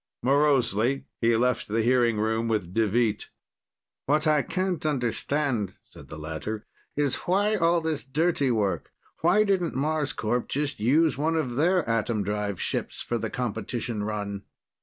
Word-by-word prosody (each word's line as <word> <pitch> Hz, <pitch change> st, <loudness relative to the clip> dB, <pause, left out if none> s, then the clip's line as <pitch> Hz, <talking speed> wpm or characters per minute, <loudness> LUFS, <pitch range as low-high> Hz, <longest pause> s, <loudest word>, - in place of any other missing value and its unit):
Morosely, 135 Hz, -3 st, +2 dB
he 115 Hz, 0 st, +3 dB
left 125 Hz, +2 st, +1 dB
the 110 Hz, +2 st, 0 dB
hearing 120 Hz, -2 st, +3 dB
room 110 Hz, +1 st, 0 dB
with 105 Hz, -6 st, -1 dB
Deveet. 110 Hz, 0 st, +1 dB, 0.8 s
"What 150 Hz, +3 st, +2 dB
I 155 Hz, -2 st, +4 dB
can't 185 Hz, -1 st, -2 dB
understand," 130 Hz, -5 st, -1 dB
said -, -, -14 dB
the 75 Hz, -, -8 dB
latter, 80 Hz, +9 st, -5 dB, 0.3 s
"is 145 Hz, -3 st, +1 dB
why 205 Hz, +4 st, +3 dB
all 170 Hz, -4 st, +3 dB
this 160 Hz, -2 st, -2 dB
dirty 145 Hz, 0 st, +1 dB
work, 100 Hz, -7 st, 0 dB, 0.3 s
why 180 Hz, +6 st, +4 dB
didn't 190 Hz, -5 st, 0 dB
Marscorp 145 Hz, -5 st, -1 dB
just 145 Hz, 0 st, -2 dB
use 140 Hz, +5 st, +3 dB
one 160 Hz, +2 st, +1 dB
of 130 Hz, -7 st, -1 dB
their 175 Hz, +3 st, +2 dB
atom 115 Hz, -2 st, 0 dB
drive 105 Hz, -1 st, -2 dB
ships -, -, -3 dB
for 120 Hz, -, -2 dB
the -, -, -3 dB
competition 115 Hz, -2 st, -3 dB
run?" 100 Hz, -2 st, -4 dB
125 Hz, 145 wpm, -26 LUFS, 110-155 Hz, 0.8 s, I